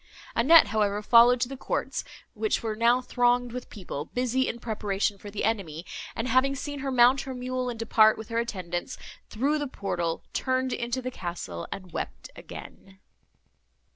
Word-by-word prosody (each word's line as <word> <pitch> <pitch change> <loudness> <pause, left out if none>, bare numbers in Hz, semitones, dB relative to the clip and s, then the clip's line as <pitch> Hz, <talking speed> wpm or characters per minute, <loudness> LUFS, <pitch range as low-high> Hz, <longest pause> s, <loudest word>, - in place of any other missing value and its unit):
Annette, 300 +8 +7
however, 210 -1 0
followed 240 +2 +6
to 250 - +2
the 270 - -6
courts, 260 - -2 0.3
which 430 - -1
were 220 -1 -2
now 235 +3 +3
thronged 245 -1 +1
with 250 +1 -7
people, 175 -8 -6
busy 255 +5 0
in 235 - -3
preparation 205 -3 -1
for 205 - -9
the 205 0 -4
enemy; 185 -7 -2 0.3
and, 225 - -2
having 260 +3 +3
seen 285 +1 -5
her 270 0 -3
mount 255 +1 +5
her 265 -1 -6
mule 255 0 -2
and 240 - -5
depart, 220 -1 +4
with 220 0 -8
her 230 0 0
attendants, 180 -7 -4 0.3
through 280 +7 0
the 290 - -2
portal, 175 -8 -3
turned 260 0 0
into 240 +2 -2
the 255 - -3
castle 170 - -6
and 185 -2 -7
wept - - -6
again. 190 -1 -11
235 Hz, 170 wpm, -27 LUFS, 205-255 Hz, 0.3 s, Annette